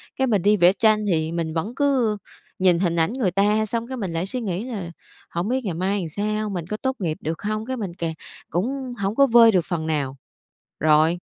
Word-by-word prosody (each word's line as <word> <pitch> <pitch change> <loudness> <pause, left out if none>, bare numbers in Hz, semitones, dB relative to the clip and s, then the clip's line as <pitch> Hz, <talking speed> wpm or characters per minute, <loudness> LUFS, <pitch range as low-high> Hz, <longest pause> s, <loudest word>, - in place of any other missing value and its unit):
cái 265 0 +1
mình 205 -6 +2
đi 210 +2 +4
vẽ 180 +1 +6
tranh 215 +1 +3
thì 160 -1 0
mình 165 -2 -2
vẫn 200 +10 -3
cứ 260 -7 +2 0.4
nhìn 180 -2 +4
hình 175 -3 +1
ảnh 165 +7 +1
người 225 -9 0
ta 210 +3 +2
xong 230 +2 -3
cái 260 -1 -5
mình 195 -6 -3
lại 165 +3 -1
suy 250 +5 -4
nghĩ 195 -1 -2
là 195 -9 -5 0.4
hổng 170 +4 -2
biết 260 +1 0
ngày 180 - -1
mai 190 +4 -1
làm 170 -3 -4
sao, 215 +4 -2
mình 175 -4 -4
có 210 - -3
tốt 265 +2 -2
nghiệp 160 -5 -2
được 160 +1 -4
hông? 215 +1 -2
Cái 260 0 -3
mình 195 -6 -4
càng 165 -2 -2 0.4
cũng 250 - -2
hổng 200 +2 -1
có 275 0 +5
vơi 230 -1 +7
được 180 -4 +2
phần 165 -4 -3
nào, 140 -4 -2 0.6
rồi, 155 +3 +4
195 Hz, 235 wpm, -23 LUFS, 170-225 Hz, 0.6 s, vơi